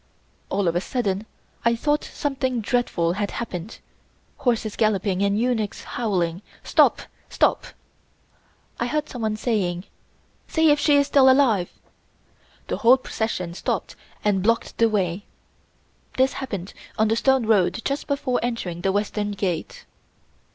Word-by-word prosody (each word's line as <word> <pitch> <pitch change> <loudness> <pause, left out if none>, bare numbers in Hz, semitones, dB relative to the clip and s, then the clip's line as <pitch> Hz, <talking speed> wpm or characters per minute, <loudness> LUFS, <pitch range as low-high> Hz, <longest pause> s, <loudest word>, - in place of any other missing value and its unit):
All 195 -1 0
of 170 - +1
a 175 - +1
sudden 210 -3 -2 0.4
I 235 0 +3
thought 295 +5 0
something 260 -3 -2
dreadful 215 -7 0
had 205 +1 -2
happened, 205 -3 -5 0.6
horses 230 -4 0
galloping 200 -3 +1
and 200 +1 +2
eunuchs 230 -4 -1
howling: 185 -6 -1 0.2
"Stop! - - +3 0.3
Stop!!" - - +1 1.1
I 240 - 0
heard 300 +3 -1
someone 220 -3 -3
saying: 185 -7 -1 0.6
"See 320 -2 +3
if 295 - +3
she 290 0 +4
is 285 - +4
still 270 -2 +5
alive." 245 -9 +3 1.0
The - - -3
whole 255 +1 +6
procession 220 -8 -3
stopped - - -3 0.3
and 200 -2 +2
blocked 230 +4 0
the 230 0 +5
way. 195 -2 -1 0.9
This 260 +1 +3
happened 200 -8 -5 0.2
on 220 0 +3
the 220 - +2
stone 265 0 +2
road 210 -3 +2
just 275 +1 -2
before 280 -3 0
entering 210 -8 -3
the 195 - +1
Western 205 +1 -1
Gate. 185 -5 -3
220 Hz, 135 wpm, -23 LUFS, 195-250 Hz, 1.1 s, whole